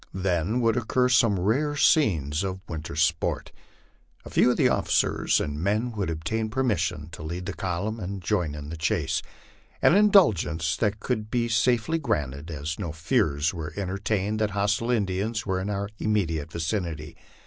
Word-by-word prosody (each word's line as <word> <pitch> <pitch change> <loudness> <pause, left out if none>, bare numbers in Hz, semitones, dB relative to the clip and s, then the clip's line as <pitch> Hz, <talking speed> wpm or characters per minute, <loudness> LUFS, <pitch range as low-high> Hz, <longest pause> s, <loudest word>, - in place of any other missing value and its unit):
Then 95 +5 0
would 115 0 +2
occur 125 +2 +1
some 110 -5 +4
rare 135 +11 +1
scenes 85 - +2
of 95 -1 -4
winter 80 -2 -6
sport: 80 +1 0 0.7
a - - -9
few - - +4
of - - +1
the - - +4
officers - - +2
and 75 0 -3
men 105 +6 0
would 105 -6 -3
obtain 85 +8 -2
permission 105 - -1
to 80 - -10
lead 85 +4 -5
the 100 - -4
column 95 +5 -3
and 100 0 -4
join 90 -6 -1
in 75 0 -7
the 80 - -6
chase 85 -2 0 0.6
an - - +5
indulg 195 - +5
ence 80 0 -1
that 105 -1 0
could 110 -3 -2
be 120 0 0
safely 120 +7 +2
granted, 75 - -2
as 75 +2 -4
no 85 -6 -3
fears 80 -1 +1
were 80 -3 -6
entertained 100 +2 -1
that 110 -1 +1
hostile 105 +4 +1
In 115 -5 +2
dians 105 +4 -2
were 95 -2 0
in 100 - -3
our 100 0 -2
immediate 85 -8 -1
vicinity. 80 -3 -3
95 Hz, 170 wpm, -26 LUFS, 80-110 Hz, 0.7 s, an